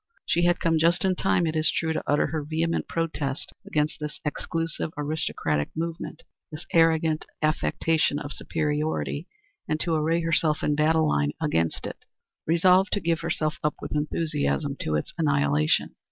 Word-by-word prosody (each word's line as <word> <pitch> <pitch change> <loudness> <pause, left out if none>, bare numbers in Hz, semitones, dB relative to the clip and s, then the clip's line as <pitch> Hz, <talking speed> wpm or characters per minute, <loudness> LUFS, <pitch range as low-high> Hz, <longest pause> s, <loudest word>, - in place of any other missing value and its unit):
She 175 +1 +2
had 175 0 +3
come 165 -2 +2
just 170 +3 +3
in 190 - +3
time, 180 -1 +1
it 160 0 -1
is 155 0 +4
true, 160 -1 0
to - - -2
utter 145 0 +3
her 155 0 -2
vehement 160 +3 -1
protest 155 -4 -3
against 150 0 0
this 150 -1 -5
exclusive, 165 +1 -2
aristocratic 145 - -1
movement 165 0 -4 0.3
this 155 +2 -8
arrogant 160 -1 +3 0.2
affectation 155 0 +1
of 145 0 -5
superiority, 155 +1 -2 0.4
and 155 - 0
to 170 - 0
array 160 +2 +1
herself 160 -1 +1
in 150 - +2
battle 155 +1 +3
line 75 - +1
against 85 - 0
it, - - -7 0.4
resolved 180 +4 +4
to 205 - +2
give 165 -3 0
herself 155 -2 -1
up 150 - +1
with - - -7
enthusiasm 150 -1 -1
to 75 - -1
its 75 - -2
annihilation. 75 +1 +2
155 Hz, 160 wpm, -26 LUFS, 150-165 Hz, 0.4 s, is